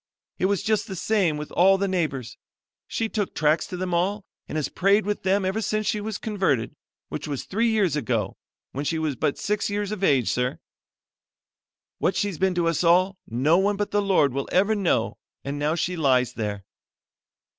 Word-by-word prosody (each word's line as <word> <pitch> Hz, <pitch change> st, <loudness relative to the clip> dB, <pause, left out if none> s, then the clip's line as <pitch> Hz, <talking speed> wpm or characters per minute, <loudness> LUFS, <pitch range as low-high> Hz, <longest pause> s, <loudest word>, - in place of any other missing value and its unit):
It -, -, +1 dB
was 200 Hz, -1 st, 0 dB
just 215 Hz, +1 st, 0 dB
the 190 Hz, -, -5 dB
same 185 Hz, -5 st, +1 dB
with 150 Hz, 0 st, -7 dB
all 195 Hz, +2 st, +5 dB
the 200 Hz, +1 st, 0 dB
neighbors. 155 Hz, -10 st, -2 dB, 0.5 s
She 225 Hz, -, -1 dB
took 210 Hz, -3 st, -3 dB
tracts 155 Hz, +1 st, +2 dB
to 180 Hz, -, -6 dB
them 180 Hz, 0 st, -3 dB
all 190 Hz, +4 st, 0 dB, 0.2 s
and -, -, -6 dB
has 155 Hz, -2 st, 0 dB
prayed 200 Hz, +2 st, +2 dB
with 205 Hz, 0 st, -2 dB
them 190 Hz, +1 st, +1 dB
ever 195 Hz, +4 st, -1 dB
since 215 Hz, 0 st, -1 dB
she 210 Hz, -, 0 dB
was 215 Hz, 0 st, -4 dB
converted, 190 Hz, -, -1 dB, 0.3 s
which -, -, -5 dB
was 140 Hz, -3 st, -3 dB
three 225 Hz, +4 st, 0 dB
years 200 Hz, -9 st, +2 dB
ago, 115 Hz, -9 st, -1 dB, 0.4 s
when 140 Hz, -, -4 dB
she 160 Hz, +2 st, -1 dB
was 155 Hz, -3 st, -1 dB
but 140 Hz, -, -1 dB
six 210 Hz, 0 st, -1 dB
years 205 Hz, 0 st, -2 dB
of 205 Hz, -2 st, -4 dB
age, 135 Hz, -, +3 dB
sir. 125 Hz, +1 st, -1 dB, 1.4 s
What 190 Hz, -, +1 dB
she's 200 Hz, -6 st, -1 dB
been 190 Hz, -1 st, +2 dB
to 170 Hz, -1 st, +1 dB
us 165 Hz, 0 st, +1 dB
all 185 Hz, +3 st, +3 dB
no 140 Hz, +10 st, +3 dB
one 205 Hz, +1 st, +2 dB
but 205 Hz, 0 st, -2 dB
the 205 Hz, -, +2 dB
Lord 185 Hz, -9 st, +3 dB
will 140 Hz, 0 st, -3 dB
ever 200 Hz, +4 st, +3 dB
know 200 Hz, -5 st, 0 dB, 0.2 s
and 140 Hz, +1 st, -4 dB
now 150 Hz, +2 st, +1 dB
she 175 Hz, +2 st, -1 dB
lies 130 Hz, -6 st, +2 dB
there." 105 Hz, -4 st, -4 dB
180 Hz, 200 wpm, -25 LUFS, 150-205 Hz, 1.4 s, all